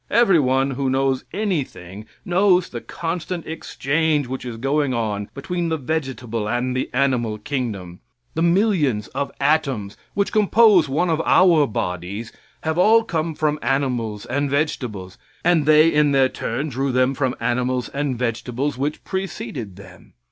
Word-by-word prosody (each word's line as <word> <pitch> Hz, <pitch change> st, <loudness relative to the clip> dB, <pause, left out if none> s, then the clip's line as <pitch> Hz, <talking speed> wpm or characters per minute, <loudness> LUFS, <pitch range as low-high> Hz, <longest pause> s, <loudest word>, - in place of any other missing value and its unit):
Everyone 140 Hz, -, +3 dB
who 135 Hz, 0 st, -1 dB
knows 135 Hz, 0 st, 0 dB
anything 130 Hz, -, -4 dB, 0.2 s
knows 180 Hz, 0 st, +3 dB
the 120 Hz, -, -6 dB
constant 170 Hz, +1 st, -4 dB
exchange 155 Hz, -1 st, -1 dB
which 130 Hz, +1 st, -6 dB
is 120 Hz, -2 st, -5 dB
going 135 Hz, +1 st, 0 dB
on 105 Hz, -3 st, -2 dB
between 170 Hz, +5 st, -3 dB
the 160 Hz, -, 0 dB
vegetable 130 Hz, -7 st, -3 dB
and 125 Hz, +2 st, -1 dB, 0.2 s
animal 125 Hz, -4 st, +1 dB
kingdom. 110 Hz, -10 st, -4 dB, 0.3 s
The 160 Hz, -, -2 dB
millions 170 Hz, -, +2 dB
of 140 Hz, +1 st, -3 dB
atoms 135 Hz, -8 st, 0 dB, 0.2 s
which 200 Hz, 0 st, 0 dB
compose 210 Hz, -6 st, +5 dB
one 165 Hz, +6 st, +1 dB
of 160 Hz, 0 st, +1 dB
our 170 Hz, -6 st, +5 dB
bodies 100 Hz, +2 st, -4 dB, 0.3 s
have 160 Hz, +2 st, -1 dB
all 225 Hz, +4 st, +5 dB
come 160 Hz, -4 st, -2 dB
from 150 Hz, -1 st, 0 dB
animals 120 Hz, -5 st, -1 dB
and 140 Hz, +3 st, -1 dB
vegetables, 125 Hz, -, -2 dB, 0.3 s
and 165 Hz, -4 st, +3 dB
they 155 Hz, +1 st, +6 dB
in 150 Hz, -2 st, +3 dB
their 135 Hz, -1 st, +4 dB
turn 135 Hz, +7 st, -3 dB
drew 135 Hz, +1 st, -1 dB
them 130 Hz, +1 st, +2 dB
from 130 Hz, -2 st, -1 dB
animals 125 Hz, +1 st, 0 dB
and 140 Hz, -3 st, -2 dB
vegetables 125 Hz, +3 st, -2 dB
which 145 Hz, +2 st, -2 dB
preceded 130 Hz, -, -5 dB
them. 95 Hz, -2 st, -15 dB
135 Hz, 145 wpm, -21 LUFS, 120-160 Hz, 0.3 s, they